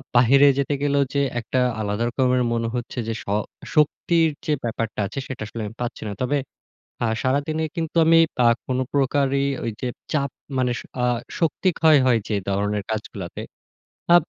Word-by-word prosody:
বাহিরে 135 +4 +6
যেতে 140 +1 0
গেলেও 145 -1 +2
যে 140 - +2 0.2
একটা 120 +2 -1 0.2
আলাদা 105 +1 -1
রকমের 125 0 +2
মনে 115 0 0
হচ্ছে 120 0 -5
যে 115 - -1
শ - - -31 0.5
শক্তির 160 +2 +3 0.2
যে - - 0
ব্যাপারটা 115 -2 -3
আছে 135 - -5
সেইটা 130 -4 -6
আসলে 115 +1 -6
আমি 105 +2 -8
পাচ্ছি 120 - -4
না। - - -4
তবে, 145 +3 +1 0.7
আ - - +3 0.2
সারাদিনে 145 +5 0
কিন্তু 165 -1 -3
আমি 165 +1 +6 0.3
আ - - +7 0.2
কোনো 130 0 0
প্রকারই 140 0 +2 0.2
ঐযে 115 +2 -3 0.3
চাপ 140 -2 +1 0.3
মানে 125 -1 +1
শ - - -7 0.2
আ - - +4 0.3
শক্তি 170 +3 +1
ক্ষয় 160 -2 +6
হয় 120 -3 +4
যেই 105 -2 -1
ধরনের 105 +1 0
কাজগুলাতে, 105 -5 -5 0.7
আ - - +8
130 Hz, 170 wpm, -23 LUFS, 115-145 Hz, 0.7 s, আ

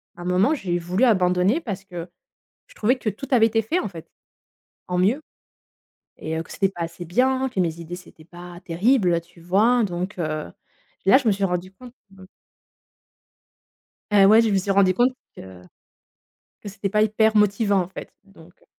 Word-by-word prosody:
un 175 - -9
moment, 185 - +2
j'ai 180 - -2
voulu 180 +7 -1
abandonner 185 - +2
parce 200 - -6
que 175 -3 -8 0.6
je - - -20
trouvais 245 +5 +1
que 230 - -3
tout 235 +7 -6
avait 230 -4 +5
été 225 0 0
fait 320 +12 -1
en 210 - -3
fait, 165 -4 -11 0.8
en 180 0 -2
mieux 215 +11 +2 1.0
et 160 +1 -4
heu, - - -2
que - - -19
c'était 195 - +1
pas 175 -3 -6
assez 170 +1 -6
bien, 260 +9 +1
que 190 - -2
mes 170 -1 -2
idées, 170 +2 -7
c'était 165 -3 -16
pas 175 +1 -12
terrible, 180 -1 +2
tu 170 +1 -21
vois? 210 +8 +2
Donc, 180 +1 -4
heu, 155 - -3 0.6
là 225 +7 +7
je 265 - -7
me - - +4
suis 195 0 -1
rendu 180 +1 -3
compte 245 +4 -14 0.2
me 190 -1 -15 1.9
et 200 -2 +6
ouais, 220 +3 +7
je 225 - +1
me 195 - +2
suis 195 +1 -1
rendu 195 -1 +4
compte 245 +6 +2 0.2
que 95 -1 -12 1.0
que 205 - -7
cétait 200 0 -4
pas 210 +1 +1
hyper 220 +1 +2
motivant, 205 -1 +2
en 175 - -4
fait - - -9
donc 180 -4 -19
heu - - -26
195 Hz, 190 wpm, -23 LUFS, 175-220 Hz, 1.9 s, là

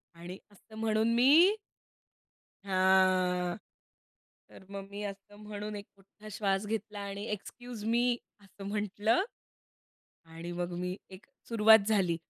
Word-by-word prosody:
आणि 175 +3 -8
असं 205 +2 -17
म्हणून 220 +1 +1
मी 310 - +6 1.1
हां, 185 -1 +3 0.9
तर 190 - -15
मग 195 0 -7
मी 200 +1 -7
असं 200 0 -8
म्हणून 210 0 -6
एक 200 0 -7
मोठा 200 +2 -16
श्वास 195 -1 0
घेतला 215 -1 -4
आणि 200 0 -5
"एक्सक्यूज 235 +2 -7
मी", 240 +2 +2 0.2
असं 195 0 -12
म्हंटलं 210 - +1 1.0
आणि 165 +1 -8
मग 175 0 -3
मी 180 +1 -3
एक 190 +5 -13 0.2
सुरुवात 220 -1 +7
झाली. 190 -6 +2
205 Hz, 120 wpm, -31 LUFS, 185-220 Hz, 1.1 s, सुरुवात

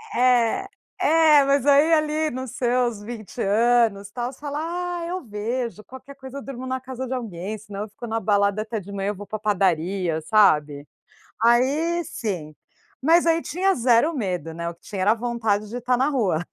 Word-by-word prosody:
É, 250 +7 +3 0.3
é 310 -2 +5
mas 275 -1 +2
aí 290 +3 +5
ali 310 0 +1
nos 255 -1 -5
seus 245 -3 0
20 220 +1 -7
anos 215 -1 +2
tal, 240 +2 -3
você 265 - -17
fala: 290 0 -4 0.4
"Ah, 335 - -4
eu 365 0 -4
vejo 225 +1 -4
qualquer 260 +3 -12
coisa, 265 0 -9
eu - - -6
durmo 260 -2 -7
na 260 0 -2
casa 260 0 -6
de 260 - -3
alguém. 210 -4 -5
Senão 205 -1 -8
eu 215 - -5
fico 215 +3 -9
na 225 0 -1
balada 200 -1 +1
até 220 0 -4
de 200 0 -11
manhã 200 0 -2
eu 210 - -3
vou 205 +2 -9
para 215 - -5
padaria". 185 -4 0
Sabe? 150 -8 +3 0.6
Aí 285 +9 +2
sim, 175 - -5 0.5
mas 335 +4 +4
aí 330 0 +3
tinha 380 +3 +1
zero 245 +6 +3
medo, 180 - -3
né. 170 +1 -4
O 170 - -6
que 170 - -37
tinha 195 -3 -5
era 205 - +4
a - - +2
vontade 225 -3 -1
de 235 - -6
estar 250 +1 +1
na 265 +3 +2
rua. 200 - 0
235 Hz, 195 wpm, -23 LUFS, 205-265 Hz, 0.6 s, é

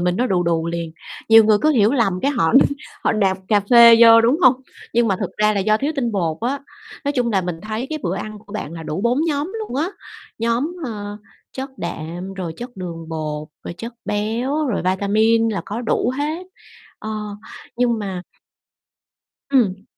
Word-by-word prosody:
mình 180 0 0
nó 250 - +1
đù 180 -6 +1
đù 165 -1 0
liền. 170 -1 -4 0.4
Nhiều 225 0 +8
người 215 -1 +4
cứ 310 - +4
hiểu 225 -5 +3
lầm, 195 -9 +1
cái 280 - +2
họ 240 - +1 0.5
họ - - +3
nạp 195 -3 +1
cà 210 -1 +4
phê 235 -1 +9
vô, 230 -1 +9
đúng 240 +7 +3
hông? 255 0 +7 0.4
Nhưng 235 -1 +3
mà 195 - +1
thực - - -4
ra 215 0 +3
là 200 - +1
do 215 +2 +3
thiếu 285 +7 -1
tinh 240 -4 -1
bột 170 -6 -1
á. 255 +5 -1 0.5
Nói 285 - 0
chung 245 -4 0
là 195 - +3
mình 175 -2 -5
thấy 220 +4 -4
cái 310 - -2
bữa 180 -1 -1
ăn 215 0 -6
của 200 - -13
bạn 215 -7 -5
là 165 -1 -7
đủ 155 +2 -4
4 235 +4 +1
nhóm 300 +3 -1
luôn 425 - -5
á. 310 +5 0 0.5
Nhóm, 235 +9 0
ờ, 205 -4 -5 0.4
chất 265 +1 -6
đạm, 175 +3 -5
rồi 180 -4 -4
chất 245 -1 -9
đường 170 -3 -7
bột, 155 -1 -4 0.2
rồi - - -6
chất 230 +4 -6
béo, 235 +9 -1
rồi 240 - -1
vitamin 215 +4 +2
là 210 -3 -2
có 210 +4 -4
đủ 240 +1 0
hết. 315 +5 -3 0.5
Ờ, 215 - -6 0.7
nhưng 240 -2 +1
mà 190 -3 -4 1.3
Ừm. 205 -8 +2
215 Hz, 200 wpm, -20 LUFS, 185-245 Hz, 1.3 s, phê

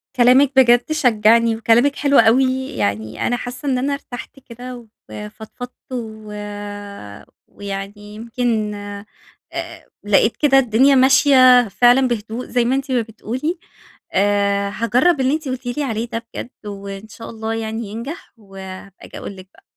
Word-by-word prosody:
كلامِك 255 +2 +5
بجد 245 +2 +4
شجعني، 230 -4 +3
وكلامِك 230 +5 +3
حلو 280 -1 +2
أوي، 260 +3 +3
يعني 110 +2 -2
أنا 245 - 0
حاسة 250 +4 -7
إن 255 - +1
أنا 275 +3 -1
إرتحت 275 -1 -8
كده 245 -1 -10 0.2
وفضفضت، 220 +4 -9 0.2
و 220 -3 -6 1.2
ويعني 200 +1 -8
يمكن 225 -1 -2
آآ، 205 0 -8 1.0
لقيت 210 +2 +2
كده 270 -3 +4
الدنيا 260 +3 +4
ماشية 255 -2 +6
فعلًا 245 +5 +4
بهدوء، 230 +1 -4
زي 245 -1 0
ما 255 +3 +1
أنتِ 270 0 -3
ما 245 - +2
بتقولي 245 - -4 0.5
آآ، 200 0 +1
هاجرب 250 +8 +2
اللي 260 +3 +2
أنتِ 310 -2 -3
قلتِ 255 0 -5
لي 245 +4 -2
عليه 230 -2 -3
ده 230 0 -5
بجد، - - -6 0.2
وإن 200 0 -7
شاء 225 +1 -10
الله 220 0 -4
يعني 225 0 -4
ينجح، 235 +10 -8
وهابقى 195 -2 -11
آجي - - -11
أقول 200 - -7
لِك 185 0 -13
بقى. - - -22
235 Hz, 145 wpm, -19 LUFS, 210-255 Hz, 1.2 s, ماشية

